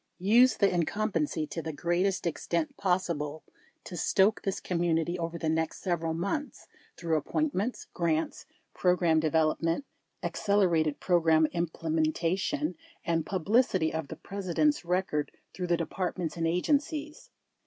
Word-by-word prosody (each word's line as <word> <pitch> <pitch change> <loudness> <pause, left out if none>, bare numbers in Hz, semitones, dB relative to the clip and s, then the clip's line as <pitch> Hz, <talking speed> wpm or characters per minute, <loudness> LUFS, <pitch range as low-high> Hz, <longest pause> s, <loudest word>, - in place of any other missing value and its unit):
374 205 +7 +5
Use 255 0 +5
the - - -1
incumbency 170 -3 0
to 165 - -5
the 160 0 -4
greatest 175 +6 0
extent 275 - -1
possible 170 -5 -1 0.4
to 180 - -8
stroke 195 +5 +3
this 195 0 -2
community 170 0 0
over 170 0 -3
the 160 - -3
next 160 0 0
several 165 -3 -1
months 200 - -3 0.3
through 165 -2 0
ap 150 - -1
pointments, 255 -7 -1
grants, 165 -2 -1 0.3
program 175 -3 +3
development, 160 - +1 0.4
accelerated 175 -8 +1
pro 175 -2 +3
gram 160 -1 +4
implementation, 170 - -1 0.3
and 165 -2 0
publicity 190 -2 +2
of 160 -2 -3
the - - -7
President's 200 - 0
record 175 -4 -1 0.2
through 180 -1 -4
the 175 -1 +2
departments 170 -1 -3
and 165 -1 0
agencies. 290 - -1
175 Hz, 130 wpm, -29 LUFS, 160-195 Hz, 0.4 s, 374